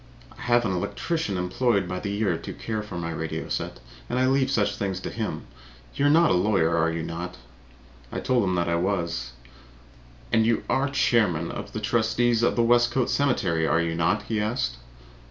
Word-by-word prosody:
I - - -14
have 120 0 +2
an 95 - 0
electrician 100 - -2
employed 100 +4 +1
by 90 - -3
the 100 - -4
year 100 -3 0
to - - -7
care 110 -1 -4
for 105 -4 -7
my 85 -1 -3
radio 80 0 -4
set - - -3 0.3
and 120 - -1
I 130 - +3
leave 130 0 +3
all 135 - -2
such 105 -2 +1
things 95 -2 -2
to - - -5
him. - - -4 0.5
You 140 - 0
are 165 +3 +5
a - - +3
lawyer, 90 -3 +2
are 85 0 +2
you 80 0 -3
not?" 85 +2 -5 0.7
I - - -3
told 125 -3 +1
him 95 -2 0
I 85 0 +1
was. 85 -8 -2 1.0
"And 110 -1 +5
you 115 0 +1
are 140 +1 +1
chairman 105 - +2
of - - -7
the 110 - -3
trustees 115 +2 +1
of 120 - +2
the 120 - +3
Westcote 120 +1 +3
Cemetery, 90 - +1
are 80 - +3
you 85 -1 0
not?" 85 +6 +1
he 110 -2 -1
asked. 65 - -1
100 Hz, 195 wpm, -25 LUFS, 85-120 Hz, 1.0 s, are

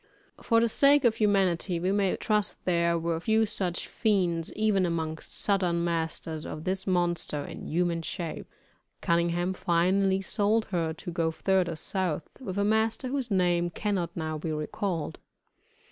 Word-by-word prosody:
For 230 -1 +3
the 235 - +3
sake 280 +4 +5
of 225 -2 +3
humanity 190 -4 +2
we 185 +3 0
may 200 -2 +1
trust 210 -1 0
there 170 -1 +2
were 165 0 -1
few 220 +4 +2
such 185 -4 -3
fiends 180 -7 0
even 215 -3 +2
among 160 -2 -1
southern 180 -4 0
masters 160 -2 -2
as 155 - -6
this 190 +2 -2
monster 175 -5 0
in - - -8
human 170 0 0
shape. 165 0 -5 0.5
Cunningham 170 +2 +1
finally 190 +2 +2
sold 210 +3 +1
her 165 -3 0
to 170 +2 -7
go 165 -1 0
further 180 0 +1
South, 170 -2 -2
with 200 -7 -5
a 200 - +2
master 220 +4 +1
whose 265 -2 -2
name 175 -3 +2
cannot 185 -2 -1
now 155 -1 -3
be 160 +1 -3
recalled. 155 +2 -3
180 Hz, 150 wpm, -28 LUFS, 170-205 Hz, 0.5 s, sake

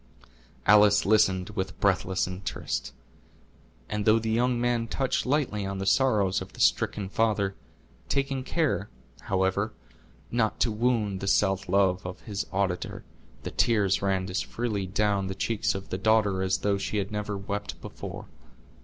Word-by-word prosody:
Alice 105 -1 +6
listened 95 -3 +3
with 95 -1 -4
breathless 95 -2 +1
interest; 90 -8 -4 1.0
and 105 0 -2
though 110 +2 +5
the 110 0 -1
young 120 +2 +2
man 120 -1 0
touched 135 +2 -1
lightly 130 -7 0
on 100 0 -3
the 95 - -3
sorrows 100 -5 +2
of 95 - -9
the - - -13
stricken 100 -2 +2
father; 100 -1 +1 0.6
taking 135 -1 0
care, 135 -8 0 0.3
however, 95 +3 0 0.6
not 115 -2 0
to 115 - +2
wound 105 -3 0
the 100 - -4
self 95 -2 +2
love 95 -1 +2
of 90 0 -7
his 100 -3 -4
auditor, 95 -2 -2 0.4
the - - -4
tears 105 -5 +2
ran 95 -1 0
as 90 0 -1
freely 105 -5 -3
down 100 0 +1
the 95 - -4
cheeks 110 -1 0
of 95 0 -6
the 95 - -3
daughter 105 -2 +3
as 95 0 +1
though 100 -1 0
she 100 +2 -2
had 100 0 -2
never 105 -1 -3
wept 100 +1 -5
before. - - -8
100 Hz, 155 wpm, -27 LUFS, 95-110 Hz, 1.0 s, Alice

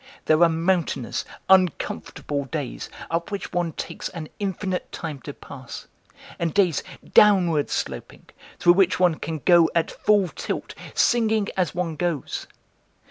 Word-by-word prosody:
There 155 +1 +4
are 170 - +7
mountainous, 165 -6 0 0.2
uncomfortable 170 -5 +1
days, 145 -2 -5 0.2
up 170 +1 -1
which 200 -1 -5
one 175 -2 -1
takes - - -5
an 165 -4 -7
infinite 190 -2 -3
time 155 -4 -5
to 145 - -7
pass, 130 -2 -10 0.5
and 170 0 -1
days 185 -6 +3 0.3
downward 180 -8 +5
sloping, - - -4 0.3
through 175 - +6
which 185 -1 +3
one 175 -3 +3
can 155 -2 -5
go 170 -3 +6
at 170 - +1
full 205 -4 +2
tilt, - - -5 0.2
singing 220 -3 +2
as 180 -5 0
one 170 -3 -2
goes. 170 -4 -2
170 Hz, 135 wpm, -24 LUFS, 155-190 Hz, 0.5 s, are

